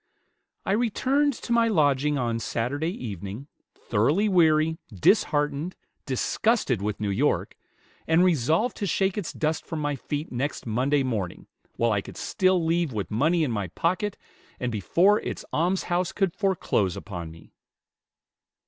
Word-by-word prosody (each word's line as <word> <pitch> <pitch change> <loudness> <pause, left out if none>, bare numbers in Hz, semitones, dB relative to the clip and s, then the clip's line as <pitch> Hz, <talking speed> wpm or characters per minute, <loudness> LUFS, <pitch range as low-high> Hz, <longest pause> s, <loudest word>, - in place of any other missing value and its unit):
"I - - 0
returned 260 +6 +2
to 235 0 -4
my 235 -1 +4
lodging 150 -6 +2
on 120 -3 -1
Saturday 125 +8 -2
evening, 105 - -6 0.3
thoroughly 145 - +1
weary, 160 -4 +3
disheartened, 145 - +1 0.3
disgusted 135 - +1
with 105 0 -2
New 105 -1 -1
York, 135 +10 0 0.5
and 165 +2 +4
resolved 165 - +2
to 200 - -2
shake 190 +2 +1
its 205 -5 -3
dust 155 0 -1
from 165 - -5
my 145 -1 -1
feet 145 +3 -5
next 130 +4 -3
Monday 130 +5 +1
morning, 110 -9 -3 0.3
while 115 0 +1
I 100 -2 +1
could - - -11
still 185 -3 +1
leave 165 -2 +1
with 105 -4 -4
money 160 +10 +2
in 140 - 0
my 100 -4 -2
pocket, 185 - -1 0.4
and 125 -1 -2
before 175 - +3
its - - -5
almshouse 180 +1 0
could 195 -4 0
foreclose 175 - 0
upon 85 -2 -6
me." 80 +1 -15
150 Hz, 145 wpm, -26 LUFS, 115-185 Hz, 0.5 s, my